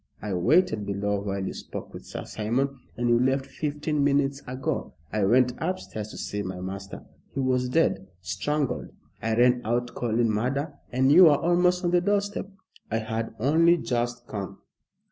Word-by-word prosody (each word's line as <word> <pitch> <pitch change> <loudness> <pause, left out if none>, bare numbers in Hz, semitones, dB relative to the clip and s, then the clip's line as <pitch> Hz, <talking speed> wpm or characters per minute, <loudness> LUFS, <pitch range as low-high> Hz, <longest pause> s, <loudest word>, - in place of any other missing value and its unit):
I 105 -2 -4
waited 110 - +3
below 100 0 -1
while 100 -1 -3
you - - -3
spoke - - -8
with - - -10
Sir - - -6
Simon, 130 +5 -1 0.2
and 120 +1 0
you 120 0 +4
left 130 +2 +1
fifteen 150 0 -2
minutes 140 0 +2
ago. 130 +1 -3 0.2
I 105 -1 +1
went 125 +4 +4
upstairs 160 - -3
to - - -9
see 105 - -3
my 95 -2 -5
master. 95 +1 -7 0.3
He - - -1
was 130 -1 +1
dead 125 -10 +1
strangled. 135 +8 -2 0.3
I 110 +1 0
ran 125 +1 +4
out 120 +2 -1
calling 115 -1 +1
murder, 135 +8 -1 0.2
and 130 +2 +3
you 180 +4 +9
were 150 -3 +6
almost 180 +2 +2
on 175 - +2
the 175 0 +4
doorstep." 200 0 0 0.4
"I 115 - 0
had 110 0 -3
only 165 +7 +4
just 120 -3 -2
come." 100 -4 -6
125 Hz, 170 wpm, -26 LUFS, 110-145 Hz, 0.4 s, you